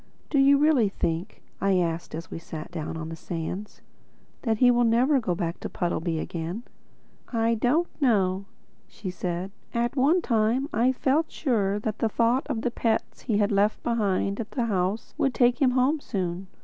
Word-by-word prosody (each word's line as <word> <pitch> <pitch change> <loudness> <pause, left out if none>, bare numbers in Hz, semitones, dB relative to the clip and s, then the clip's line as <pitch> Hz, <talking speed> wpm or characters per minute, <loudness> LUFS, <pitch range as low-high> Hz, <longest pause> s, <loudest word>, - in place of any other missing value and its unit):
"Do 285 - +3
you 280 +1 +6
really 285 -8 +4
think," 170 +1 -3 0.2
I 195 -1 +3
asked 170 -2 -1
as 165 +1 -7
we - - -5
sat 160 0 -8
down 160 -1 -4
on 160 0 -5
the 165 - -5
sands, 175 +5 -6 0.6
"that 225 -3 0
he 245 +2 +6
will 240 0 +3
never 245 +5 +4
go 185 -7 -1
back 170 -1 -3
to - - -5
Puddleby 170 -1 -1
again?" 170 +7 -4 0.7
"I 230 -1 +2
don't 250 +9 +2 0.2
know," 195 -7 +2 0.4
said 185 -3 -6
she. 185 +6 -5
"At 240 +2 0
one 300 +7 +3
time 230 +3 +1
I 235 +4 +3
felt 280 +5 +1
sure 205 -8 0
that 215 -1 -3
the 225 - +1
thought 235 +4 +1
of 255 -7 -2
the 245 - 0
pets 225 -1 -1
he 220 -5 0
had 205 0 +2
left 205 +1 +2
behind 200 -4 0
at 225 - -4
the 245 -3 -1
house 195 0 -1
would 270 -4 +1
take 245 +1 +3
him 265 - +5
home 275 +5 +3
soon. 185 -6 -3
215 Hz, 185 wpm, -26 LUFS, 185-245 Hz, 0.7 s, you